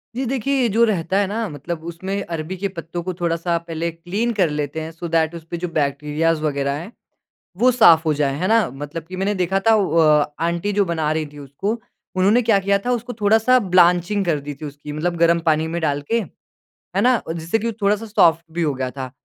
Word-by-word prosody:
जी 265 - -2
देखिए, 270 +2 -1
ये 240 - +2
जो 225 +3 +3
रहता 190 -3 0
है 200 - +3
ना 220 +3 -2
मतलब 160 +3 -6
उसमें 190 +4 -4
अरबी 165 +2 -5
के 200 +2 -1
पत्तों 175 -2 -6
को 185 - -3
थोड़ा-सा 170 0 -1
पहले 170 0 -4
क्लीन 185 +8 -2
कर 185 -7 +2
लेते 150 +1 -3
हैं, 160 - -6
सो 165 +1 -7
दैट 160 0 +1
उसपे 165 +1 -7
जो 180 +1 -3
बैक्टीरियाज़ 150 +2 0
वगैरह 140 -2 -1
है 175 +8 -8 0.7
वो 250 +5 +4
साफ 170 -9 +6
हो 155 - +2
जाए, 140 -2 0
है 185 - 0
ना? 225 +1 +3
मतलब 145 +4 -7
कि 185 - -7
मैंने 195 +2 0
देखा 190 +1 0
था 225 +3 +3
अ, 155 -6 +3
आँटी 170 +4 -1
जो 200 0 +2
बना 160 -3 -1
रही 155 0 -1
थी 145 - -11
उसको, 145 +10 -3 0.4
उन्होंने 200 +6 +4
क्या 220 -4 +3
किया 200 +1 +2
था 250 - +1
उसको 245 +1 -2
थोड़ा-सा 220 +5 +4 0.2
ब्लांचिंग 180 +3 +4
कर 160 -4 +1
दी 145 +1 -6
थी 155 - -4
उसकी 145 +1 -8
मतलब 170 +4 -2
गरम 170 0 +4
पानी 155 +1 +2
में 170 - -1
डाल 145 -2 0
के, 230 - +3 0.8
है - - +3
ना? 250 -1 +3
जिससे 165 +5 -1
कि 225 - -4
वो 230 - 0
थोड़ा-सा 210 +3 +1
सॉफ्ट 170 -5 +3
भी 170 +1 -2
हो 150 -3 0
गया 130 -1 -3
था। 130 -1 -6
170 Hz, 225 wpm, -21 LUFS, 155-200 Hz, 0.8 s, साफ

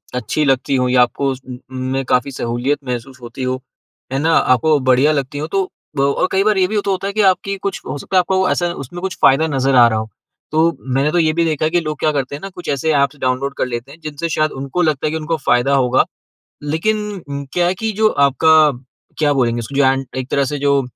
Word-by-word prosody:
अच्छी 140 +4 -1
लगती 135 0 +1
हों, 125 -1 +1
या 125 0 +4
आपको 135 +3 +1
उन 130 -1 -7
उन 130 0 -5
में 135 0 -1
काफ़ी 125 +2 +2
सहूलियत 125 +3 -1
महसूस 125 +2 -5
होती 120 +2 -7
हो, 130 0 -2 0.5
है 135 - 0
ना? 160 +3 +2
आपको 145 +5 +3
बढ़िया 130 +3 +3
लगती 140 -1 -2
हों 155 - -3
तो। 195 - +3 0.4
और 140 +6 +1
कई 190 +1 +2
बार 215 -1 +2
ये 185 -1 +3
भी 210 +1 -1
तो 200 - +1
होता 190 +1 -2
है 200 - -4
कि 215 - +1
आपकी 195 +2 -4
कुछ 200 +1 -4
हो - - -4
सकता 165 - -5
है, - - +8
आपको 190 +1 +1
ऐसा 175 - +1 0.2
उसमें 175 +7 -9
कुछ 190 0 -3
फ़ायदा 135 +4 +5
नज़र 135 0 +2
आ 120 -1 +8
रहा 110 -1 0
हो। 110 0 -5 0.4
तो 160 +2 +2 0.2
मैंने 140 +3 +2
तो 175 - 0
ये 160 -2 +2
भी 170 +1 +1
देखा 155 -1 0
है 155 - 0
कि 175 - +3
लोग 155 -3 -4
क्या 155 - +2
करते 140 -1 -2
हैं 145 - -9
ना, 195 - -6
कुछ 180 -2 -9
ऐसे 145 +3 0
एप्स 140 +1 0
डाउनलोड 130 +2 -1
कर - - 0
लेते 120 +2 -5
हैं, 155 - -14
जिनसे 155 +2 -4
शायद 155 -1 0
उनको 140 +6 -2
लगता 155 -4 +1
है - - -1
कि 160 - -2
उनको 160 +1 -2
फ़ायदा 135 +3 +3
होगा। 130 -1 +3 0.6
लेकिन 205 +6 -2 0.3
क्या 175 -1 +2
है 180 - +1
कि 220 +4 -3
जो 215 - +6
आपका, 155 +1 +4 0.5
क्या 150 -2 +3
बोलेंगे 120 -4 +1
उसको, 120 +5 -8
जो 135 -1 +1
एक 130 - -8
तरह 140 - +2
से - - -3
जो 140 0 +2
145 Hz, 245 wpm, -18 LUFS, 130-165 Hz, 0.6 s, है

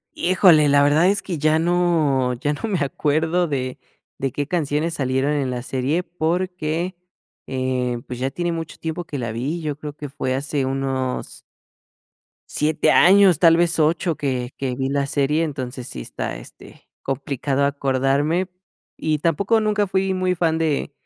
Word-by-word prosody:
Híjole, 175 -5 +5
la 140 0 +5
verdad 155 +5 +4
es 200 0 +2
que 175 -5 -4
ya 155 +2 +2
no 160 -7 +2
ya 145 +5 -1
no 145 - -8
me 195 -5 -1
acuerdo 160 +4 0
de 130 -3 -3 0.4
de 135 -1 -2
qué 145 +2 -3
canciones 160 -1 -1
salieron 130 +1 0
en 140 -3 0
la 125 -1 -3
serie, 135 +7 -1
porque, 175 0 -2 0.5
eh, 130 -2 -2
pues, 125 -1 -7
ya 130 +1 0
tiene 175 +2 -2
mucho 165 -1 -5
tiempo 165 +2 -4
que 145 - -5
la 115 -4 -3
vi, 140 +9 -3
yo 150 -2 -3
creo 150 -1 -7
que 145 -2 -7
fue 130 -1 -2
hace 140 0 -1
unos 135 -1 -3 1.1
7 150 +1 +1
años, 190 -2 +6
tal 165 -1 +5
vez 170 0 +2
8 165 +2 +1
que 130 -3 -3
que 130 -2 -2
vi 135 +1 -2
la 140 0 0
serie, 145 +3 +1
entonces, 130 -5 -5
sí 60 - -7
está, - - -5
este, - - -15
complicado 135 0 -1
acordarme. 140 +5 +1 0.5
Y 155 -1 -1
tampoco 195 +8 +2
nunca 210 -1 +1
fui 190 0 0
muy 185 0 +1
fan 165 -2 +1
de 155 -3 -1
150 Hz, 165 wpm, -22 LUFS, 135-170 Hz, 1.1 s, años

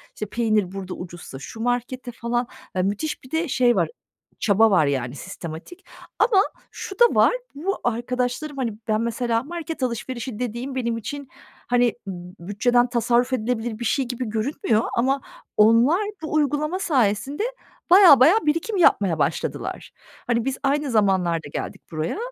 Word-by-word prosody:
işte, 210 - -4
peynir 215 -3 0
burada 190 -1 -6
ucuzsa 175 -6 -9
şu 220 +10 -9
markete." 245 +1 -2
falan, 240 +1 -2 0.3
ııı, 185 - +2
müthiş 210 +12 -2
bir 255 - -15
de 325 +1 0
şey 245 -2 +3
var, - - +1 0.5
çaba 220 +1 +4
var, 175 -6 +4
yani, 130 -2 -1
sistematik. 170 - -9 0.3
Ama 400 -5 +5 0.3
şu 390 +2 -8
da 480 - +9
var, - - +5 0.2
bu 370 +7 -2
arkadaşlarım, 250 +5 -2
hani, 240 -5 -1
ben 215 0 +1
mesela 235 0 0
market 325 -2 -5
alışverişi 240 -1 -4
dediğim 250 +2 -4
benim 235 -3 -1
için, 280 +5 -6 0.4
hani, 245 -1 +3
b 195 - -3 0.4
bütçeden 245 +4 +2
tasarruf 245 +1 +1
edilebilir 235 -1 -2
bir 240 - -4
şey 265 +4 +1
gibi 245 +1 -4
görünmüyor 225 0 0
ama 270 +3 +2 0.4
onlar 230 - +5 0.2
bu 315 - -5
uygulama 305 +4 +1
sayesinde 265 - +1 0.5
bayağı 355 -7 +9
bayağı 335 +11 +5
birikim 330 +8 0
yapmaya 195 - +3
başladılar. - - -2 0.4
Hani, 235 -1 +1
biz 270 -1 -1
aynı 280 0 +1
zamanlarda 185 -7 +2
geldik - - -5
buraya. 155 - -2
245 Hz, 150 wpm, -23 LUFS, 215-280 Hz, 0.5 s, da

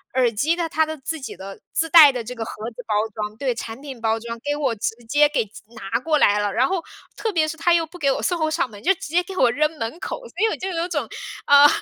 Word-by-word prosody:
耳 250 -3 +3
机 285 +10 +1
的 340 -1 -1
它 315 0 +2
的 315 0 -6
自 315 +3 -5
己 260 - -7
的 195 +1 -9
自 325 0 0
带 310 -4 +9
的 245 -2 -4
这 240 +3 -6
个 230 -2 -5
盒 - - -6 0.2
子 225 - -23
包 210 - 0 0.2
装 210 0 -4
对， 260 -1 0
产 225 0 -7
品 270 -4 -8
包 225 0 +1
装 230 +1 -7
给 290 +4 -2
我 280 -5 0
直 220 +1 -2
接 290 +5 +5
给 290 -6 0
寄 210 - -14
拿 225 +2 -2
过 310 +3 +1
来 205 -7 +4
了。 205 -1 0
然 255 +6 +3
后 370 0 -2 0.3
特 445 - -2
别 320 -5 +2
是 315 - -4
它 340 +2 +3
又 335 -1 +3
不 330 +3 -13
给 275 -2 +2
我 - - -1
送 355 -2 0
货 315 -1 +1
上 310 -4 0
门， 205 -1 -12
就 380 - +4
直 - - -25
接 345 +3 +3
给 380 +2 -9
我 250 -3 +4
扔 300 +4 +2
门 230 +7 -4
口。 - - -4
所 - - -18
以 445 - +3
我 - - -1
就 380 - -4
有 340 -1 -2
种， 290 -9 -2 0.4
呃， 285 0 +8
285 Hz, 310 characters per minute, -22 LUFS, 230-325 Hz, 0.4 s, 带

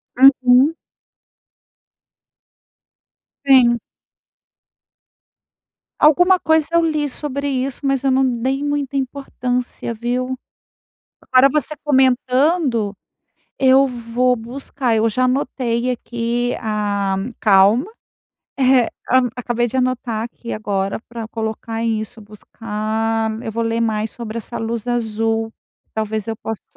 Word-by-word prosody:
Uhum. 260 +2 +5 2.7
Sim. 255 -3 +6 2.2
Alguma 355 +5 +5
coisa 320 -2 +2
eu 335 - +4
li 305 -2 0
sobre 280 +1 -2
isso, 265 0 -2
mas 275 -1 0
eu 270 - +2
não 265 +1 +3 0.2
dei 265 +4 -1
muita 290 -1 -2
importância, 250 -3 -3
viu. 250 +3 -2 0.8
Agora 255 +1 +5
você 305 +1 +1
comentando, 260 - +2 0.7
eu 265 +1 +5
vou 245 +1 0
buscar. 245 +1 -3
Eu 220 +1 +2
já 255 +4 0
anotei 250 -2 0
aqui 240 0 -2
a 205 -3 -1 0.2
calma. 205 - +4 0.7
Eh, 255 -2 +4 0.2
hã, 255 -1 +4
acabei 240 0 -1
de 250 - -7
anotar 250 -3 -1
aqui 235 0 -7
agora 200 -1 -2
para 230 -2 -6
colocar 225 0 -4
isso. 220 0 -3
Buscar 220 +1 -3
eu 220 - -5
vou 230 +2 -2
ler 230 0 -1
mais 220 -1 -1
sobre 230 -1 -7
essa 225 - -5
luz 225 +1 -4
azul. 225 -1 -1 0.4
Talvez 220 -1 -2
eu 225 - -2
posso 220 -1 -6
240 Hz, 110 wpm, -19 LUFS, 225-265 Hz, 2.7 s, Sim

